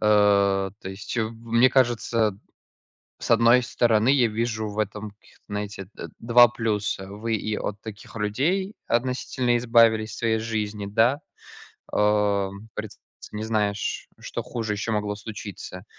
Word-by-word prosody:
то 100 -2 +3
есть 95 +5 -6
в, 110 -1 -1
мне 115 +3 +4
кажется. 115 -4 +2 0.9
С - - -4
одной 115 +2 +6
стороны, 120 -1 +2
я 135 -4 +4
вижу 110 0 -2
в 105 - -8
этом 105 0 -3
каких-то, 100 - -24
знаете, 100 -2 -5
д - - -8
два 120 +1 +7
плюса. 105 -4 -2
Вы 110 +3 -3
и 110 0 -2
от 105 - -4
таких 110 0 -10
людей 150 - 0
относительно 125 0 0
избавились 115 -2 +4
в - - -8
своей 115 -1 +1
жизни, 105 -2 -3
да. 115 +8 +2 0.7
Ам, 105 0 +1
приц 105 -1 -6 0.3
не 105 +1 -4
знаешь, 105 -2 -1
что - - -5
хуже 110 -3 -3
ещё 105 +2 -3
могло 105 -1 -1
случиться. 100 -2 -8
110 Hz, 140 wpm, -25 LUFS, 105-115 Hz, 0.9 s, два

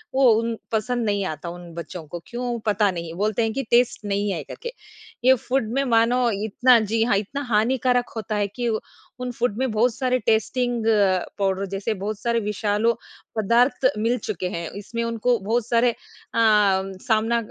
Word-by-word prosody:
वो 265 -2 +6
उन 230 -1 -2
पसंद 235 +1 0
नहीं 205 -1 0
आता, 160 0 -5
उन 175 -1 -10
बच्चों 170 0 -7
को 175 +3 -6
क्यों? 240 -1 -3
पता 205 -1 +3
नहीं, 170 -2 -6
बोलते 210 +5 0
हैं 225 -1 -1
कि 270 +1 -2
टेस्ट 235 -3 +3
नहीं 205 0 0
है 165 -5 -3
करके। 475 - -7 0.5
ये 260 - +8
फूड 250 -4 0
में 275 - +1
मानो 240 +2 +3 0.2
इतना 245 +3 +5
जी 220 +1 0
हाँ 215 -4 +2
इतना 245 +8 -3
हानिकारक 245 +2 +2
होता 215 -1 -3
है 205 -1 +1
कि 240 +4 -4 0.5
उन 250 0 -3
फूड 235 -3 -1
में 260 -1 0
बहुत 225 +2 +2
सारे 255 -1 +1
टेस्टिंग 240 +2 +1 0.6
पाउडर 195 0 0
जैसे 195 +3 -2
बहुत 205 +1 -4
सारे 235 -1 0
विशालो 210 +1 0 0.4
पदार्थ 240 +5 +3
मिल 230 +4 +1
चुके 185 -3 -3
हैं। 170 -1 -4
इसमें 230 +3 -4
उनको 230 +1 +1
बहुत 225 +4 -1
सारे 235 0 +3
अ, - - -13 0.4
सामना 215 +2 +2
225 Hz, 175 wpm, -23 LUFS, 200-245 Hz, 0.6 s, ये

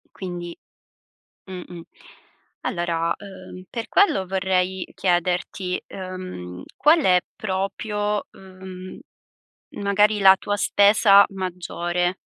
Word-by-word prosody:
Quindi 175 -2 -6 0.9
mh-mh. 180 -2 -8 0.8
Allora, 170 -2 -1
uhm, 185 -2 -11
per 230 -2 -5
quello 290 - +3
vorrei 190 -1 0
chiederti, 180 +1 -1
uhm, 185 - -7
qual 310 +4 +5
è 180 -1 +5 0.2
proprio, 205 +1 -2
uhm, 185 -1 -11 0.8
magari 205 +1 +3
la 190 0 +8
tua 205 0 -2
spesa 200 0 +6
maggiore? 180 -1 -2
185 Hz, 90 wpm, -23 LUFS, 180-200 Hz, 0.9 s, la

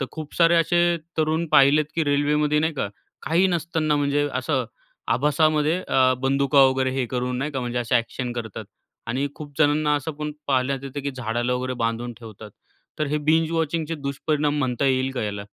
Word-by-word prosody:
तर 135 - -1
खूप 155 -2 -8
तर 170 0 +5
असे 175 +1 +2 0.2
तरुण 160 +2 +1
पाहिलेत 140 +2 +6
की 165 - +1
रेल्वेमध्ये 150 +1 +2
नाही 160 +2 +1
का 135 - -2 0.3
काही 170 +6 +2
नसताना 165 -3 0
म्हणजे 145 0 +1
असं 130 0 -1 0.5
आभासामध्ये 155 +4 +2
अ, 130 -1 +4
बंदुका 140 +1 +3
वगैरे 130 0 0
हे 125 - 0
करून 125 0 -1
नाही 145 +3 -2
का 135 - -2
म्हणजे 120 0 -3
असे 120 -1 -1
अ‍ॅक्शन 120 +1 -1
करतात. 115 -4 -6 0.4
आणि 130 +4 -1
खूप 145 -2 -10
जणांना 150 0 +3
असं 150 +3 -4
पण 150 0 -3 0.2
पाहण्यात 135 0 +1
येतं 140 +1 -5
की 140 - -2
झाडाला 120 0 -1
वगैरे 130 +1 -2
बांधून 115 +1 -2
ठेवतात. 110 -2 -11 0.5
तर 155 - 0
हे 150 +2 -1
बिंज 160 +1 +3
वॉचिंगचे 165 0 -1
दुष्परिणाम 145 +1 -1
म्हणता 130 -1 -1
येईल 130 0 +1
का 125 - -3
याला? 100 -1 -4
145 Hz, 180 wpm, -23 LUFS, 130-155 Hz, 0.5 s, पाहिलेत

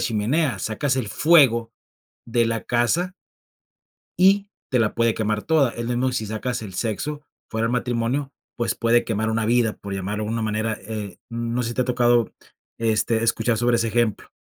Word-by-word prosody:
chimenea, 120 +7 0
sacas 130 +5 -1
el 115 -5 -2
fuego 120 -7 +4 0.5
de 115 0 +2
la 115 -1 -2
casa 155 +10 +1 1.1
y 195 +2 +4 0.2
te 125 - +2
la 110 - +1
puede 115 -1 +2
quemar 105 -1 -1
toda, 150 -6 +3
es 120 0 -5
lo 120 - -3
mismo 130 +2 +1
si 110 -3 -2
sacas 115 +3 -3
el 95 -4 -8
sexo 145 +9 -3 0.3
fuera 110 0 -1
del 120 - -1
matrimonio, 125 +3 -1 0.2
pues, 120 - 0
puede 120 0 +2
quemar 110 0 -1
una 110 -1 0
vida, 115 -2 +2
por 100 -1 -7
llamarlo 105 +3 -3
de 105 - -4
una 115 0 -1
manera, 110 +1 -1
eh, 105 -3 -6
no 115 +1 -2
sé, 115 - -2
si - - -5
te 130 - +3
ha - - -5
tocado, 120 -2 +2 0.5
este, 115 0 +1
escuchar 115 0 +1
sobre 120 +1 +2
ese 115 0 0
ejemplo. 115 -2 0
115 Hz, 185 wpm, -23 LUFS, 110-125 Hz, 1.1 s, fuego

